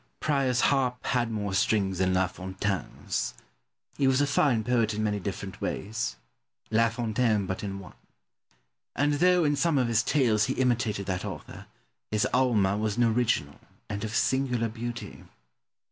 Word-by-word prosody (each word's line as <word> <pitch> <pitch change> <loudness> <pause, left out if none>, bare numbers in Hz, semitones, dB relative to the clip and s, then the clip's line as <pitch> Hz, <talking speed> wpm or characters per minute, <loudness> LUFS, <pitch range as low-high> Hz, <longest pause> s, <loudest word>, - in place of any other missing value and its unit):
Pope. - - -46
Prior's 135 -4 +2
harp 130 -3 +1
had 120 -2 +1
more 105 -3 -3
strings 95 -1 +1
than 95 -1 +2
La 95 0 +3
Fontaine's. 95 0 -3 0.6
He 135 - +3
was 130 0 +3
a 145 - +4
fine 135 -5 +2
poet 115 -2 +1
in 110 - -1
many 105 -1 0
different 100 +1 -6
ways: 110 - -3 0.6
La 115 +1 +4
Fontaine 115 -2 0
but 95 +2 -4
in 100 -1 -4
one. 95 -2 -11 1.0
And, 145 +1 +2
though 180 0 +4
in 145 -1 +2
some 165 0 +2
of 125 -2 +2
his 115 -1 +3
tales 115 -5 +2
he 130 - -1
imitated 120 -6 0
that 90 -1 -2
author, - - -8 0.4
his 105 -1 +1
"Alma" 110 -6 +3
was 110 0 -1
an 120 - +4
original, 110 -11 +1 0.3
and 100 0 -4
of 110 0 -4
singular 125 -3 +1
beauty. 120 +2 -6
115 Hz, 160 wpm, -28 LUFS, 100-125 Hz, 1.0 s, a